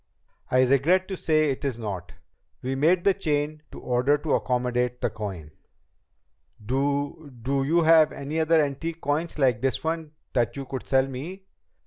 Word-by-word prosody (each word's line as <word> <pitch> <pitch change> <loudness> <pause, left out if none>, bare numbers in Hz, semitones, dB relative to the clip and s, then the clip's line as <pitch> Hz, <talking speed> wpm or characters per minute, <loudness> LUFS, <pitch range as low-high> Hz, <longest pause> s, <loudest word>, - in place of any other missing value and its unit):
"I 130 0 +4
regret 145 +9 +3
to 190 - -2
say 155 -4 +2
it 135 - -5
is 135 -5 -2
not. 95 -6 -6 0.5
We 130 +1 -1
made 165 +6 +3
the 200 - +4
chain 155 -4 -1
to - - -9
order 125 +4 +2
to 150 0 -2
accommodate 125 -1 0
the - - -1
coin." 95 -8 -6 1.1
"Do 140 +4 -1
do 135 +3 0
you 165 +5 +2
have 160 -1 +6
any 145 +3 -4
other 160 0 +4
antique 165 +4 -5
coins 155 +4 -2
like 125 -6 +2
this 135 0 0
one 160 -1 -3 0.2
that 120 -3 +1
you 135 - -4
could 130 -1 -6
sell 135 -1 +4
me?" 150 +9 -7
140 Hz, 165 wpm, -26 LUFS, 125-160 Hz, 1.1 s, have